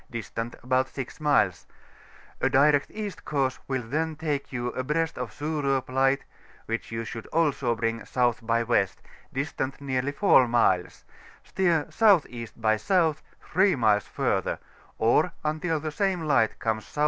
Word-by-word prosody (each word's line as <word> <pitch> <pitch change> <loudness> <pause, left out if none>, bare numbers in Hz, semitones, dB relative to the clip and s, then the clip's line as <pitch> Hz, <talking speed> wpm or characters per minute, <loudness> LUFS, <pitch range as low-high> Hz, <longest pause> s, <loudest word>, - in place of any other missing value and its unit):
distant 115 0 -5
about 130 +1 +2
6 135 +3 -7
miles: 95 - +2 0.7
a - - +3
direct 145 +1 +4
East 210 -2 -6
course 135 -3 -1
will 130 -2 -1
then 155 +7 -2
take 150 -3 -3
you 120 -2 -2
abreast 150 +6 -1
of 125 -2 -4
Surop 140 -1 -1
Light, 135 +1 +2 0.4
which 115 0 -4
you 115 0 -3
should 115 0 -7
also 140 -7 +1
bring 115 0 -1
S. - - -15 0.3
by 115 0 +1
W., 115 -4 +2 0.4
distant 135 -1 -3
nearly 135 0 -1
4 145 -6 +5
miles; 105 -7 +1 0.4
steer 170 -5 +1
S.E. 160 - +3
by 110 -1 +2
S., 110 - -5 0.5
3 190 0 +3
miles 105 -5 +2
further, - - -1 0.4
or 120 +10 +3
until 155 +1 -1
the 155 +1 -4
same 190 +2 0
light 135 -8 +2
comes 110 -1 -1
S.W. - - -10
135 Hz, 150 wpm, -26 LUFS, 115-155 Hz, 0.7 s, 4